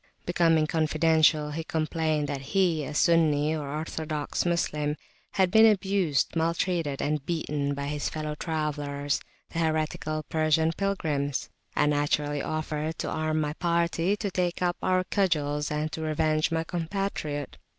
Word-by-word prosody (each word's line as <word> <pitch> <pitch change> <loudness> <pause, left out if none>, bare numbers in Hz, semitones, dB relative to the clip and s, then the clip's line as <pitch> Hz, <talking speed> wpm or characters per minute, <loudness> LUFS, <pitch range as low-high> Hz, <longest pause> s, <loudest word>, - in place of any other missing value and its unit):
Becoming 165 -3 +3
confidential, 155 -1 +3
he 165 +2 -3
complained 155 -1 0
that 140 -1 -3
he, 165 +1 +1
a 145 +2 -6
Sunni, 155 -2 +3
or 145 -3 -4
orthodox 155 +1 -2
Moslem, 150 -3 0 0.4
had 190 -2 +2
been 220 +1 +8
abused, 190 -8 +1
maltreated, 165 -3 0
and 150 -1 -1
beaten 145 -3 -2
by 140 0 -3
his 145 0 -2
fellow 155 -1 -4
travellers, 145 -3 -2 0.3
the 165 - -3
heretical 155 -1 -1
Persian 160 +1 +2
pilgrims. 150 -8 -1 0.3
I 150 - +3
naturally 145 0 +1
offered 155 0 -3
to - - -3
arm 155 0 0
my 150 -1 -1
party, 170 +3 +1
to 205 -2 -3
take 180 -1 -1
up 175 0 +1
our 185 0 +2
cudgels, 150 -7 0
and 150 +1 -2
to 160 - -5
revenge 155 0 +1
my 165 0 0
compatriot. 165 -4 -3
155 Hz, 140 wpm, -27 LUFS, 150-170 Hz, 0.4 s, been